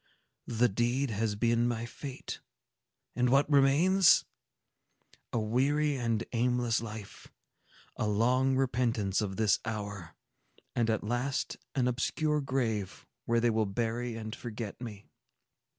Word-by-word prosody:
The 120 +1 +3
deed 120 +5 0
has 105 0 -1
been 115 +2 +2
my 115 -1 -2
fate. 130 +3 -7 0.8
And 125 0 +2
what 135 +3 +4
remains? 150 +7 +5 1.1
A - - -1
weary 140 +7 +1
and 115 -3 0
aimless 120 -1 +1
life,—a 110 0 -9
long 125 +5 +2
repentance 120 -7 +1
of 95 -2 -3
this 110 -1 +3
hour,—and 105 +2 -6
at 110 - 0
last 120 +5 -2 0.2
an 130 -2 +2
obscure 150 +5 0
grave, 115 -8 -2 0.2
where 115 0 +2
they 120 0 +2
will 110 -1 +1
bury 115 +3 -2
and 110 0 -6
forget 115 -2 -6
me!" 105 -4 -8
120 Hz, 120 wpm, -30 LUFS, 110-130 Hz, 1.1 s, remains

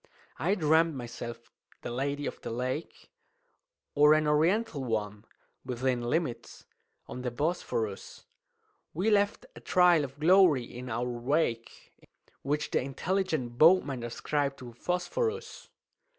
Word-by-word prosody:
"I 190 +5 +1
dream'd 160 -2 +3
myself 120 -1 -8 0.3
the - - -4
Lady 140 +3 -2
of - - -5
the - - -6
Lake, 130 +6 -5 0.8
Or 150 +1 +6
an 155 0 +1
Oriental 160 +2 +1
one 105 -3 -3 0.4
(within 125 0 -1
limits) 120 -1 -3 0.4
on 125 - -7
the 125 - -2
Bosphorus; 120 - -3 0.7
We 195 +7 +1
left 205 - +1
a - - -10
trail 180 -4 +4
of 140 +1 -8
glory 170 -5 +5
in 125 +2 -9
our 120 +1 -2
wake, 120 0 -2 0.5
Which 150 +2 -2
the - - +2
intelligent 140 -3 -2
boatman 155 -6 +5
ascribed 140 +4 -2
to 120 -2 -10
phosphorus. 440 - -3
145 Hz, 120 wpm, -29 LUFS, 120-170 Hz, 0.8 s, Or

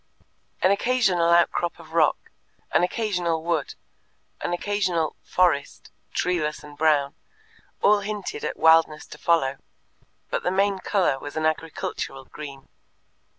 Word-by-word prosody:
An 185 - +5
occasional 200 -6 +2
outcrop 170 0 +2
of 160 -1 -14
rock, 160 -3 +2 0.4
an - - +4
occasional 180 -4 -1
wood, 165 -4 -1 0.7
an - - -2
occasional 180 -3 0
"forest," 175 -6 0 0.2
treeless 155 -5 -1
and 150 0 -12
brown, 145 -2 +2 0.7
all 210 0 +5
hinted 205 -1 -5
at - - -3
wildness 160 -1 +4
to - - -12
follow, 140 -5 +2 0.7
but - - 0
the - - 0
main 195 +1 +1
colour 185 -10 +1
was 145 +3 -7
an 155 - 0
agricultural 155 -4 -3
green. 140 -2 -10
170 Hz, 125 wpm, -24 LUFS, 150-185 Hz, 0.7 s, An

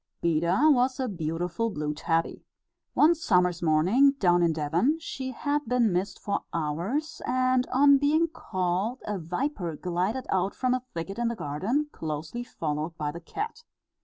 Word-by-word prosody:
Beda 170 - +2
was 255 -1 +2
a 260 - 0
beautiful 175 +3 -2
blue 150 -6 -3
tabby. 165 +2 -1 0.5
One 315 +3 +6
summer's 180 - +1
morning, 180 - +4
down 175 -9 +3
in 170 -1 +3
Devon, 160 - +1
she 265 -5 -5
had 290 +3 -1
been 235 -4 +2
missed 185 +3 -2
for 200 -1 -1
hours, 175 - -2
and 255 0 +1
on 280 +1 +5
being 310 +4 +3
called, 190 - -2
a 210 -2 -3
viper 175 - -3
glided 185 - -2
out 190 +1 0
from 255 -1 +1
a 255 - 0
thicket 195 +6 -4
in 240 - +1
the 235 - -1
garden, 210 - -1
closely 160 +9 -5
followed 160 -5 -4
by 150 -1 -2
the 170 +3 -9
cat. 435 - -5
195 Hz, 160 wpm, -27 LUFS, 165-260 Hz, 0.5 s, One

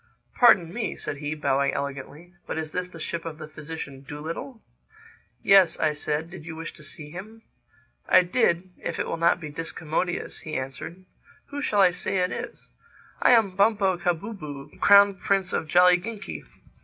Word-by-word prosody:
"Pardon 180 -8 +5
me," 230 -1 -3
said 145 - -4
he, 145 +1 -4
bowing 140 -2 +1
elegantly, 140 +5 -6
"but - - -4
is 155 -1 -4
this 180 +2 -3
the 170 -2 -12
ship 165 +1 -4
of 160 -2 -6
the 155 -1 -8
physician 150 -3 -8
Dolittle?" 160 - -7 0.8
"Yes," 195 -3 +6
I 155 -1 +2
said, 150 +2 -2
"did 175 - -9
you 160 0 -7
wish 165 +1 -7
to 150 - -14
see 150 0 -8
him?" 215 +6 -10 0.7
"I 185 - +7
did—if 180 -2 -1
it - - -1
will - - -2
not 170 +1 +3
be 155 -4 -7
discommodious," 165 +2 -3
he 155 -1 -5
answered. 140 +7 -7 0.4
"Who 285 0 -5
shall 205 -8 +2
I 185 -2 +6
say 185 +2 -1
it 180 0 +1
is?" - - -7 0.5
"I - - +6
am 210 -6 +3
Bumpo 200 -2 +3
Kahbooboo, 170 -5 -4
Crown 200 -1 +6
Prince 195 -2 0
of 160 - -1
Jolliginki." 180 +6 +2
170 Hz, 170 wpm, -25 LUFS, 155-195 Hz, 0.8 s, I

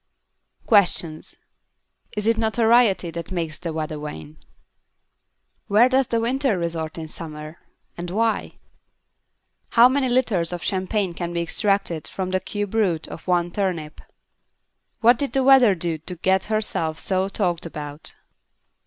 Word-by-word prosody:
QUESTIONS 175 -7 +2 0.8
Is 210 - -1
it 230 +1 +3
notoriety 225 -4 +3
that 170 0 -6
makes 165 -4 -3
the 170 - -4
Weather 155 -1 -4
Vane? 80 - -8 1.3
Where 215 +4 +5
does 260 -1 +2
the 230 - 0
Winter 250 -1 +1
Resort 165 -2 -3
in 160 -1 -6
Summer? 155 0 -8 0.4
And 175 0 -6
why? 225 +4 0 1.2
How 235 +1 +9
many 260 0 0
litres 225 -10 +1
of 175 - -5
champagne 190 -1 -1
can 175 0 -5
be 170 - -1
extracted 195 -3 0
from 185 -1 -4
the 185 - +1
cube 205 +1 -5
root 185 -8 +1
of 165 - -10
one 175 -1 +1
turnip? 170 -6 -3 1.0
_What 240 +1 +6
did 280 - -2
the 270 -1 +2
Weather 255 -6 +6
do 165 -2 -3
to 180 +4 -8
get 190 +2 +1
herself 190 -7 -2
so 190 0 0
talked 175 -4 -1
about? 150 -1 -8
185 Hz, 140 wpm, -23 LUFS, 165-220 Hz, 1.3 s, How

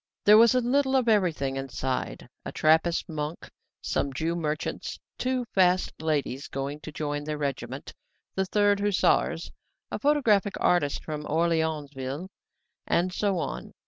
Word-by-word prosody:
There 210 +1 +8
was 230 +2 +6
a 250 - +4
little 265 +2 +2
of 255 -3 +2
everything 165 -11 +2
inside 135 -1 -3 0.2
a - - -5
Trappist 160 +2 +2
monk, 155 0 -5 0.3
some 140 - -1
Jew 160 +5 -1
merchants, 155 -2 -3 0.2
two 255 -1 0
fast 185 -1 +3
ladies 145 -4 -1
going 140 +2 -4
to 155 - -8
join 145 -1 -3
their 150 0 -3
regiment, 135 -2 -4 0.4
the 190 - 0
Third 205 +1 +2
Hussars, 205 -1 +1 0.4
a - - -3
photographic 230 -10 +3
artist 145 -6 +2
from 155 -1 -4
Orleansville, 155 -2 -1 0.6
and 180 +1 +1
so 200 -1 0
on. - - -4
160 Hz, 140 wpm, -27 LUFS, 145-205 Hz, 0.6 s, There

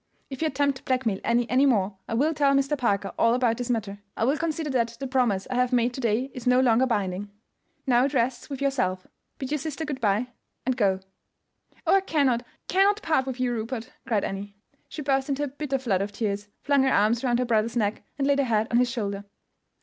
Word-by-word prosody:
If 270 - -6
you 320 - +2
attempt 280 -1 0
to - - -25
blackmail 250 -7 0
Annie 235 0 +2
any 260 +4 +4
more 200 -6 +1
I 225 - -2
will 300 +7 +2
tell 285 -2 +3
Mr. 275 +2 +2
Parker 205 -7 0
all 230 +1 +4
about 240 -3 +1
this 245 0 -4
matter. 205 -4 -2 0.2
I - - 0
will 270 +5 +3
consider 315 -1 -2
that 235 -2 0
the 275 - -4
promise 250 -7 +1
I - - 0
have 250 0 +1
made 245 0 +2
to 265 - -5
day 240 +3 0
is 250 -1 -6
no 250 0 +5
longer 255 0 +4
binding. 205 -3 -2 0.6
Now, 250 -1 +4
it 280 - -2
rests 245 +2 0
with 275 -1 -4
yourself. 185 -10 0 0.3
Bid 265 0 -5
your 300 - 0
sister 315 +2 -4
good 280 -3 -5
by, 215 +3 +1 0.4
and 255 0 +1
go." 195 -5 +1 0.8
"Oh, - - +5
I - - +1
cannot, 280 -10 +1 0.3
cannot 400 +3 +3
part 310 -5 +1
with 260 -1 -4
you, 250 -1 +1
Rupert!" 230 0 -4 0.2
cried 220 -5 +1
Annie. 200 +1 -5 0.3
She 300 - -6
burst 270 0 +1
into 280 +1 0
a - - -1
bitter 275 0 -3
flood 220 -8 0
of 200 +1 -3
tears, 205 -1 -3 0.2
flung 280 -1 +3
her 265 - +3
arms 225 +2 +2
round 240 -2 +2
her 250 - 0
brother's 230 0 +1
neck, 210 -1 0 0.2
and 275 - 0
laid 280 0 +3
her 280 - +3
head 220 -2 +1
on 235 - +3
his 250 0 +3
shoulder. 200 -5 -3
250 Hz, 230 wpm, -26 LUFS, 220-275 Hz, 0.8 s, no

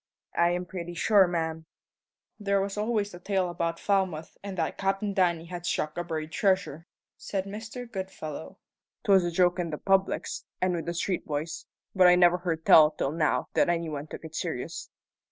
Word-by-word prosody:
"I 170 0 +4
am 180 +1 -1
pretty 175 -1 -6
sure, 195 +2 +5
ma'am." 160 -2 -3 0.7
"There 200 -1 +1
was 195 0 -2
always 210 -1 -1
a 175 - -9
tale 185 -1 0
about 170 -1 -2
Falmouth 190 -6 0
that 185 -5 -2
Cap'n 195 +1 0
Danny 175 -4 +2
had 175 0 -7
struck 155 -2 -1
a 175 - -2
buried 160 -2 -4
treasure," 185 -3 0 0.3
said 195 -1 -3
Mr. 220 +5 -7
Goodfellow. 190 - -7 0.5
"'Twas 195 -2 +5
a 175 - 0
joke 175 +1 +2
in 170 -1 -1
the 150 - -4
publics, 195 +2 0
and 185 0 +1
with 170 -1 -3
the 170 - -2
street 180 +1 -2
boys; 155 +2 -4 0.3
but 185 -2 +6
I 180 - +7
never 180 0 +5
heard 165 -2 -3
tell 155 -1 +8
till 150 -2 -2
now 155 -1 0
that - - +3
any 170 -1 0
one 150 0 -5
took 160 - -9
it 160 - -9
serious." - - -4
175 Hz, 185 wpm, -28 LUFS, 165-195 Hz, 0.7 s, tell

